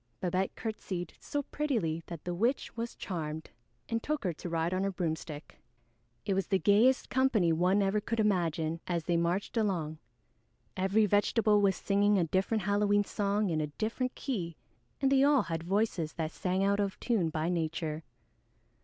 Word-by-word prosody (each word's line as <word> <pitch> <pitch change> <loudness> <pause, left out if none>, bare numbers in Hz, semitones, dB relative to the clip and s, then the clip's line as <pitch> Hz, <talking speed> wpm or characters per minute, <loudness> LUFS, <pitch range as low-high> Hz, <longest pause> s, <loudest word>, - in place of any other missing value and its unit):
Babette 185 +1 -1
curtseyed 185 -6 -4
so 290 0 -3
prettily 230 - -1
that 170 -3 -7
the 175 - -3
witch 235 +10 0
was 230 0 -4
charmed 160 -4 -5 0.4
and 230 0 -1
took 300 +1 -2
her 180 -3 0
to 175 - -7
ride 165 +1 0
on 185 +1 0
her 195 - +1
broomstick. 160 -4 -4 0.7
It 200 - +1
was 190 0 0
the 195 - +3
gayest 215 +7 +3
company 235 -10 +3
one 185 +5 +3
ever 200 +2 +1
could 230 +2 -2
imagine, 165 -6 +1
as 170 -2 -1
they 170 +1 0
marched 175 +7 0
along. 170 -8 -1 0.8
Every 195 +3 +3
vegetable 210 +1 +3
was 195 -2 +3
singing 205 0 +2
a 180 - +3
different 190 +5 0
Halloween 205 +1 +3
song 205 -1 0
in 155 -1 0
a 150 - -1
different 225 - -3
key, 180 - -3 0.4
and 275 -1 +2
they 270 -1 +5
all 285 -1 +5
had 165 -2 -3
voices 180 -3 0
that 160 -1 -3
sang 185 +2 -1
out 200 +1 +2
of 200 -2 -1
tune 210 -9 +1
by 155 +1 -2
nature. 160 -2 -2
195 Hz, 170 wpm, -31 LUFS, 170-215 Hz, 0.8 s, they